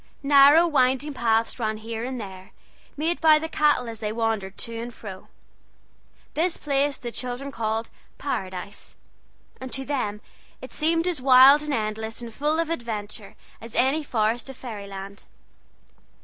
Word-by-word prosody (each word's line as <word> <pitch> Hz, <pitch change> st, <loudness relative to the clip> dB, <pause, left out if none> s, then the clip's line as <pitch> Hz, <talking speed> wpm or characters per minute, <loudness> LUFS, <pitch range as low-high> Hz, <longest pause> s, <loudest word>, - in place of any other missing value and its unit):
Narrow, 285 Hz, +4 st, +7 dB
winding 275 Hz, -2 st, +2 dB
paths 230 Hz, -1 st, +1 dB
ran 220 Hz, -2 st, -1 dB
here 225 Hz, +1 st, -5 dB
and 255 Hz, 0 st, -4 dB
there, 190 Hz, -3 st, -9 dB, 0.4 s
made 325 Hz, +4 st, -1 dB
by 315 Hz, -2 st, +7 dB
the 320 Hz, +1 st, -3 dB
cattle 295 Hz, -6 st, +2 dB
as 225 Hz, -1 st, -7 dB
they 210 Hz, -1 st, -2 dB
wandered 220 Hz, -4 st, -2 dB
to 230 Hz, -, -5 dB
and 240 Hz, +1 st, -6 dB
fro. 195 Hz, -5 st, -10 dB, 1.1 s
This 335 Hz, +2 st, 0 dB
place 280 Hz, -1 st, 0 dB
the 240 Hz, -, -6 dB
children 255 Hz, +3 st, -4 dB
called 225 Hz, -2 st, -2 dB, 0.3 s
"Paradise," 190 Hz, -7 st, -5 dB, 0.6 s
and 260 Hz, -1 st, -7 dB
to 270 Hz, 0 st, -3 dB
them 230 Hz, -8 st, -2 dB, 0.4 s
it -, -, -10 dB
seemed 330 Hz, +2 st, +1 dB
as 350 Hz, -7 st, -1 dB
wide 265 Hz, +2 st, +8 dB
and 300 Hz, -1 st, -2 dB
endless 220 Hz, 0 st, -3 dB
and 235 Hz, -2 st, -7 dB
full 300 Hz, +6 st, 0 dB
of 330 Hz, 0 st, -1 dB
adventure 215 Hz, -6 st, -5 dB, 0.3 s
as 230 Hz, 0 st, -10 dB
any 270 Hz, +5 st, +3 dB
forest 230 Hz, -1 st, 0 dB
of 270 Hz, -, -9 dB
fairy 215 Hz, -6 st, -7 dB
land. 195 Hz, +1 st, -9 dB
245 Hz, 155 wpm, -25 LUFS, 220-285 Hz, 1.1 s, wide